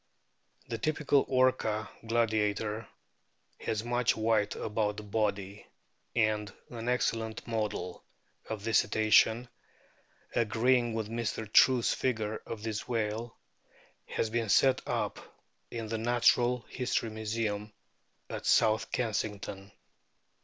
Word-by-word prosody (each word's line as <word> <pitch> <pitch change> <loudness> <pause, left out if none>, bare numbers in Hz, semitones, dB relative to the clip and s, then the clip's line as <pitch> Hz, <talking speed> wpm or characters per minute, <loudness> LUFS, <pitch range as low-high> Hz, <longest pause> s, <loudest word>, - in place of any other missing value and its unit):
The 115 -1 -4
typical 150 +1 +2
Orca 130 -5 +2 0.2
gladiator* 110 -1 0 0.7
has 110 0 -2
much 120 0 +1
white 110 -2 +1
about 105 -1 -1
the 105 - -6
body, 100 -1 -2 0.5
and 105 -3 +1 0.2
an 120 0 -4
excellent 115 -2 -1
model 105 -5 -3 0.5
of 110 -2 -4
this 115 -1 +4
Cetacean, 110 +3 +3 0.9
agreeing 120 +1 +2
with 110 -2 -2
Mr. 115 0 -3
True's 125 -3 +6
fia 130 - +1
ure 110 0 -3
of 110 -2 -6
the 110 -2 -2
whale, 115 0 -2 0.7
has 110 - -2
been 115 0 0
o - - -8
set 130 +6 +4
up - - -1 0.5
in 115 -2 -5
the 110 0 -2
Natural 120 +1 +3
History 125 -3 -1
Museum 110 -1 -2 0.6
at - - -5
South 110 -1 +3
Kensington. 105 -4 -3
110 Hz, 115 wpm, -31 LUFS, 105-120 Hz, 0.9 s, True's